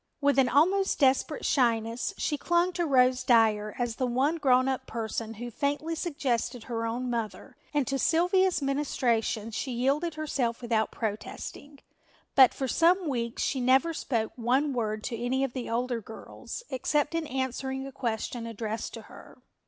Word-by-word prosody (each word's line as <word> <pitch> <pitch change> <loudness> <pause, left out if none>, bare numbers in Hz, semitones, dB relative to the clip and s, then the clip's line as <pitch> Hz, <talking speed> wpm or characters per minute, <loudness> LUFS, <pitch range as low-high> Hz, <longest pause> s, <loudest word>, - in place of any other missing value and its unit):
With 285 -1 +3
an 255 -2 +4
almost 375 +9 +3
desperate 270 +2 +2
shyness 230 -2 +1
she 295 - 0
clung 345 +4 +1
to 345 -2 -1
Rose 255 -2 +4
Dyer 220 -4 +3
as 240 -2 -2
the 255 - 0
one 270 +7 +1
grown 255 -4 +3
up 260 0 -2
person 225 0 -4
who 240 +2 -6
faintly 290 +6 -1
suggested 265 -8 -2
her 230 -2 -3
own 245 +3 -3
mother 235 +1 -4 0.2
and 290 -3 +1
to 275 0 -1
Sylvia's 355 +1 +2
ministrations 240 -5 0
she 265 - -3
yielded 280 +7 0
herself 270 -7 -1
without 230 -3 0
protesting, 240 +6 -6 0.5
but 260 -3 +7
for 265 - -3
some 340 +7 +3
weeks 235 -3 -2
she 265 - -1
never 265 +7 +3
spoke 230 -7 -2
one 260 +5 +1
word 215 -3 -2
to 235 - -3
any 260 +2 +1
of 270 -3 -2
the 255 -2 -5
older 240 0 -1
girls 220 - -9
except 295 +4 0
in 330 -2 -1
answering 265 0 -3
a 275 - -7
question 235 -2 -3
addressed 225 0 -4
to - - -9
her. - - -14
255 Hz, 165 wpm, -28 LUFS, 235-285 Hz, 0.5 s, but